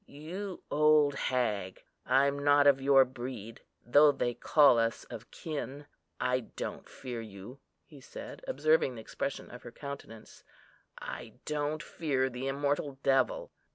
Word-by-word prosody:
You 180 +6 -7
old 150 -1 +4
hag! 110 -9 -1 0.2
I'm 140 +2 +3
not 145 0 +5
of 140 -2 +5
your 135 -1 +6
breed, 120 -3 -8 0.2
though 145 +5 +6
they 120 -3 -1
call 140 -2 +5
us 115 0 0
of 115 +1 -8
kin. 145 -2 -6 0.3
I 125 0 +1
don't 120 - -7
fear 125 -3 -6
you," 110 +4 -10 0.3
he 145 -3 -15
said, 130 - -10
observing 480 -1 +2
the - - -7
expression - - -5
of - - -10
her - - -10
countenance, 140 -6 -10 0.5
"I - - -7
don't 150 +1 -2
fear 135 -5 -1
the 125 +2 -4
immortal 140 0 -1
devil!" - - +1
140 Hz, 140 wpm, -31 LUFS, 125-150 Hz, 0.5 s, your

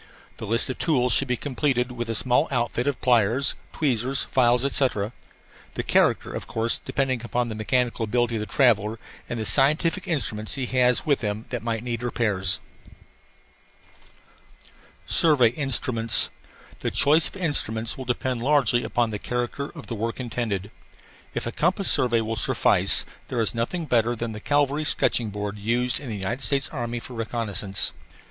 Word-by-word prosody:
The 110 - -7
list 115 +3 +3
of 130 - -5
tools 125 -7 +2
should 135 - +2
be 125 -1 0
completed 130 -2 -1
with 120 -1 -5
a 115 - -1
small 125 +7 +2
outfit 120 0 -1
of 145 - -1
pliers, 120 +2 +3 0.2
tweezers, 130 -2 +1
files, 125 0 +2
etc. 125 -6 0 0.6
the - - -2
character, - - +2
of - - -6
course, 115 +1 0
depending 130 -3 -2
upon 120 0 -1
the - - -4
mechanical 115 +2 0
ability 120 +1 0
of - - -3
the 105 - -4
traveller 110 -2 +2 0.3
and 120 - -3
the 110 - -3
scientific 155 - +2
instruments 110 - -1
he 135 -2 -2
has 125 -1 +2
with 145 -3 +1
him 105 0 -3
that 120 -3 -3
might 115 -1 -3
need 120 -2 -3
repairs. 105 -6 0 2.5
SURVEY 140 - +5
INSTRUMENTS 120 -3 +2 0.5
The - - -2
choice 150 +3 +3
of - - -12
instruments 115 - +2
will 130 - -7
depend 125 0 -2
largely 130 -3 +2
upon 120 -2 0
the 105 - -4
character 125 +5 -3
of 160 - -11
the - - -6
work 115 +2 -3
intended. 110 -5 -3 0.6
If - - -2
a - - -3
compass - - +2
survey 120 -2 +3
will 110 0 -3
suffice, - - +2 0.2
there 125 - -3
is 115 - 0
nothing 125 +9 -2
better 120 -3 +1
than 115 0 -4
the 105 - -7
cavalry 145 +4 +1
sketching 120 -6 0
board 105 0 -5
used 120 +4 0
in 140 - -8
the 110 - -4
United 115 +8 -3
States 140 -1 +2
Army 120 -4 -4
for 125 - -10
reconnaissance. 105 -4 -2
120 Hz, 165 wpm, -24 LUFS, 110-130 Hz, 2.5 s, SURVEY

